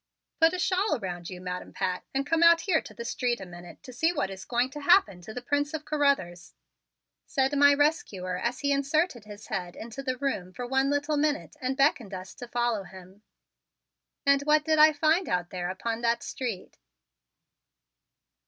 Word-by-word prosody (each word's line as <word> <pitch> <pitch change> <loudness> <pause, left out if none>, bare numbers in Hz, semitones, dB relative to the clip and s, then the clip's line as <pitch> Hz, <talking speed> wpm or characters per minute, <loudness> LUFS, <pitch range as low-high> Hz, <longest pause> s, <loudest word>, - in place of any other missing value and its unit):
"Put 325 +2 +5
a - - -2
shawl 370 -1 +1
around 175 -5 -6
you, 180 - -8
Madam 180 0 -6
Pat, 185 -2 -2
and 275 +1 -1
come 330 +2 +1
out 335 0 +7
here 350 -4 +1
to - - -12
the 235 - -7
street 240 0 -1
a 190 - -7
minute 175 -1 -12
to 255 -3 -10
see 320 +7 +2
what 285 - -2
is 190 0 -8
going 245 +1 0
to 295 - -7
happen 285 - +4
to 175 - -9
the 245 +3 -7
Prince 290 +3 0
of 310 -1 -6
Carruthers," 275 - 0 0.7
said 270 +1 +1
my 285 0 +6
rescuer 210 - 0
as 240 +7 -2
he 285 0 +1
inserted 280 - 0
his 210 0 -11
head 180 -4 -4
into 235 +4 -7
the 255 -2 -2
room 195 -10 -3
for 245 - -5
one 265 +2 +1
little 290 +1 0
minute 295 0 -1
and 260 +1 -2
beckoned 250 -8 +2
us 185 +1 -8
to 245 - -9
follow 240 -3 0
him. 190 +1 -14 1.0
And 280 0 +4
what 300 +1 +3
did 315 -1 +2
I 310 +1 +8
find 315 +4 +1
out 180 -1 -1
there 180 -1 -3
upon 225 +5 -3
that 235 0 +1
street? 230 -8 -5
255 Hz, 190 wpm, -27 LUFS, 190-290 Hz, 1.0 s, I